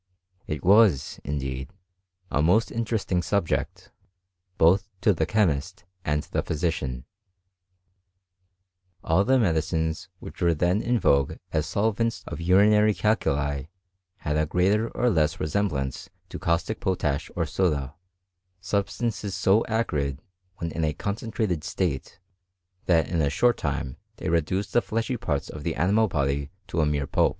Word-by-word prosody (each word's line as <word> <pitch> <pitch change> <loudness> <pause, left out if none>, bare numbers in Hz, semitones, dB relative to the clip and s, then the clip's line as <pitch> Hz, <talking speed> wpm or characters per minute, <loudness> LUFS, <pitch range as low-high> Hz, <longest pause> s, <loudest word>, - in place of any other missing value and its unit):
It 75 -3 -4
was, 100 - +4
indeed, 65 -2 -4 0.6
a 75 - +2
most 90 +9 +3
inteP 115 0 -1
esting 90 -2 0
subject, 100 -4 -1 0.7
both 95 +6 +4
to 105 - +4
the 85 - -1
chemist 90 -3 0 0.2
and 75 0 0
the - - -2
physician* 70 -6 -2 2.0
All 80 +5 +3
the 130 +4 +3
medicines 80 -5 0
which - - -10
were 85 -1 +3
then 90 +6 +1
in 120 0 +1
vogue 70 -6 +3 0.2
as 75 -1 0
sob 105 0 0
vents 115 0 -1
of - - -6
urinary 105 +4 +5
calculi 70 -10 0 0.5
had 75 0 -2
a 75 0 +1
greater 100 +7 +2
or 125 0 +1
less 80 -4 +1
reseoH 100 +7 0
blance 70 -4 -4 0.2
to - - -7
caustic 85 +6 0
potash 85 -9 -1
or - - 0
soda; 70 -7 0 0.7
substances 100 +1 -2
so 100 +4 +3
acrid^ 75 -12 0 0.4
when 85 -2 -4
in 80 - -2
a 75 -1 +1
concentrated 100 -2 -2
state, 85 -3 -3 0.7
that 80 -4 +3
in 85 -2 0
a 70 - +2
short 120 +10 +3
time 65 - -3 0.2
th&f - - -3
reduce 85 +5 0
the 120 - +3
fleshy 115 +4 -2
parts 75 - -2
of 75 - -8
the 80 +2 -2
animal 100 +8 +3
body 70 -4 -1 0.2
to 85 - -1
a - - +3
m6f0 70 -2 -1
pulp. - - +4
85 Hz, 145 wpm, -26 LUFS, 75-105 Hz, 2.0 s, urinary